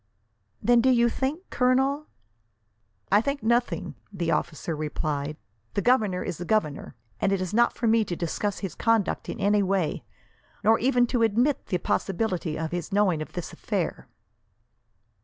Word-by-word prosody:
"Then 240 0 +5
do 260 - +3
you 235 -2 +4
think, 280 +10 -3
Colonel? 270 +3 +2 0.5
" 105 -1 -43
"I 205 +2 +6
think 280 +4 -2
nothing," 235 +2 0 0.2
the 175 -4 -2
officer 165 0 -2
replied. 150 -1 -3 0.4
"The 200 - 0
governor 215 -7 +2
is 175 -3 -5
the - - -3
governor, 165 - -1 0.2
and 195 - +1
it 195 - +1
is 185 0 -3
not 235 +2 +4
for 240 - -3
me 225 0 +4
to 175 - -3
discuss 190 +4 -2
his 180 - -5
conduct 225 -4 0
in - - -5
any 205 +1 +3
way, 190 -4 0 0.6
nor 225 +2 +5
even 245 0 +3
to 245 0 -1
admit 235 +6 +2
the 180 - 0
possibility 180 -4 -1
of 160 0 -3
his 175 +3 -4
knowing 195 -6 +2
of 155 - -7
this 175 - -5
affair." - - -3
205 Hz, 165 wpm, -26 LUFS, 170-240 Hz, 0.6 s, I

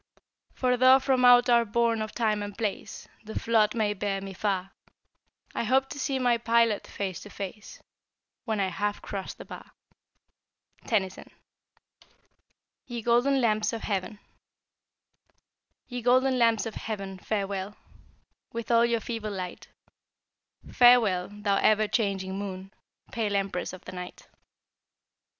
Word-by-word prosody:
For 250 -1 +1
tho' 255 +1 +7
from 260 -1 +1
out 245 0 +7
our 235 -1 +5
bourne 230 0 +1
of 215 0 -4
Time 215 -3 0
and 205 -1 -6
Place 210 -3 -4 0.2
The 220 0 -5
flood 220 -2 +2
may 215 -2 +1
bear 200 -1 -2
me 195 0 -7
far, 195 -1 -2 0.8
I - - -2
hope 265 +3 +2
to 285 - -7
see 270 0 -1
my 245 -2 +2
Pilot 230 -2 +2
face 190 -4 -4
to 205 - -11
face 200 +1 -8 0.6
When 220 -3 -2
I 190 -1 +1
have 205 +3 -3
cros't 195 -2 -5
the - - -10
bar. - - -11 1.1
Tennyson. 190 -4 -1 1.6
YE 235 -2 -5
GOLDEN 245 +4 +3
LAMPS 215 -2 +1
OF 225 - -5
HEAVEN. 200 +1 -3 1.7
Ye 245 -1 -5
golden 255 +2 +3
lamps 230 -2 +3
of 225 - -5
heaven, 195 -3 -6
farewell, 200 0 -3 0.8
With 230 0 -4
all 230 0 +5
your 235 -1 0
feeble 225 -2 -4
light; 185 -3 -6 1.0
Farewell, 225 -8 +5
thou 205 -1 0
ever 215 0 +3
changing 195 -3 -1
Moon, 195 -1 -7 0.4
Pale 215 -3 -1
empress 195 -2 -2
of 185 - -12
the - - -7
Night. 180 -1 -9
215 Hz, 135 wpm, -27 LUFS, 195-235 Hz, 1.7 s, tho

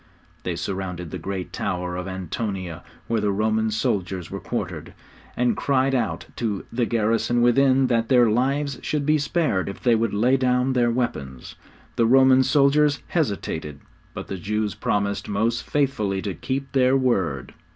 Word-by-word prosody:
They - - -3
surrounded 90 -4 -4
the - - -5
great 95 -2 -5
tower 90 -2 -3
of 90 +1 -4
Antonia 95 -1 -4 0.2
where 115 -2 0
the 105 -1 +1
Roman 110 +2 +1
soldiers 95 -4 -2
were - - -4
quartered, - - -5 0.4
and 125 0 +2
cried 135 -1 +1
out 120 -4 -1
to 105 -5 -2
the 120 -1 0
garrison 115 +1 +1
within 130 +2 +4
that 115 -2 +1
their 125 -2 +5
lives 135 +5 0
should 150 -2 -2
be 155 +1 +3
spared 145 - 0
if 100 - -9
they 120 - +4
would 115 -1 +1
lay 125 +6 +3
down 125 0 +1
their 120 -2 +2
weapons. 70 - -3 0.4
The 115 - +3
Roman 130 +1 +6
soldiers 140 +2 +3
hesitated, 90 - -2 0.4
but - - -5
the 95 - -5
Jews 105 +2 -1
promised 100 -1 -1
most 115 +3 -1
faithfully 110 -10 0
to 100 - -3
keep 135 +5 -4
their 130 0 +3
word. 95 - 0
115 Hz, 160 wpm, -23 LUFS, 100-130 Hz, 0.4 s, Roman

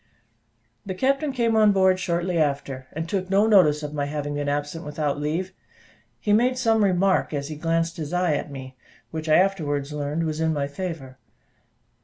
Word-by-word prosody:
The 190 -2 -5
captain 275 +7 +1
came 235 -3 +1
on 215 -2 +5
board 190 -1 +3
shortly 175 -1 -1
after, 140 -3 -1
and 160 +2 -4
took 185 +1 -2
no 200 +2 +4
notice 165 -9 +4
of 150 0 -5
my 145 -1 -1
having 145 0 -3
been 145 0 -2
absent 145 +3 -3
without 150 -1 -2
leave; 165 +6 -2 0.7
he 205 - +1
made 250 +4 +3
some 225 -3 +2
remark 190 -4 +2
as 140 +1 -3
he 155 - -5
glanced 165 +1 -1
his 155 -2 -5
eye 180 -2 +1
at 145 - -3
me, 130 -2 -9 0.4
which 160 0 -5
I 155 - +6
afterwards 150 -7 +1
learned 150 +2 -2
was 155 -1 -2
in 160 0 +1
my 140 -2 -1
favour. 140 -4 -6
160 Hz, 185 wpm, -24 LUFS, 145-190 Hz, 0.7 s, I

